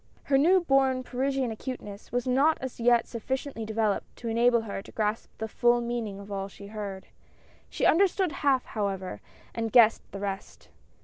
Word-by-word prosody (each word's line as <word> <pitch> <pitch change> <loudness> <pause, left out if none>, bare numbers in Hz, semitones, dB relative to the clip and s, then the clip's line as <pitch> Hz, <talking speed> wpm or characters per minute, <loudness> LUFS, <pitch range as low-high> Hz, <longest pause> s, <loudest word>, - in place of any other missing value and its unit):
Her 270 - +3
new 360 +6 +5
born 270 -4 +2
Parisian 265 0 -1
acuteness 220 -3 -7
was 245 0 -1
not 275 +5 +3
as 260 -2 -6
yet 240 0 +4
sufficiently 255 0 -4
developed 220 -2 -1
to 235 - -5
enable 235 +1 +3
her 200 -3 -5
to - - -14
grasp 215 0 -2
the 220 - -3
full 240 +2 +3
meaning 235 -4 -3
of 200 +1 -10
all 195 -1 -3
she 200 0 -12
heard. 200 -2 -6 0.6
She - - -1
understood 375 0 +3
half, 275 -4 +1
however, 190 - -3 0.3
and 225 -1 -2
guessed 230 -1 +6
the - - -6
rest. 195 -1 -6
235 Hz, 170 wpm, -28 LUFS, 210-260 Hz, 0.6 s, guessed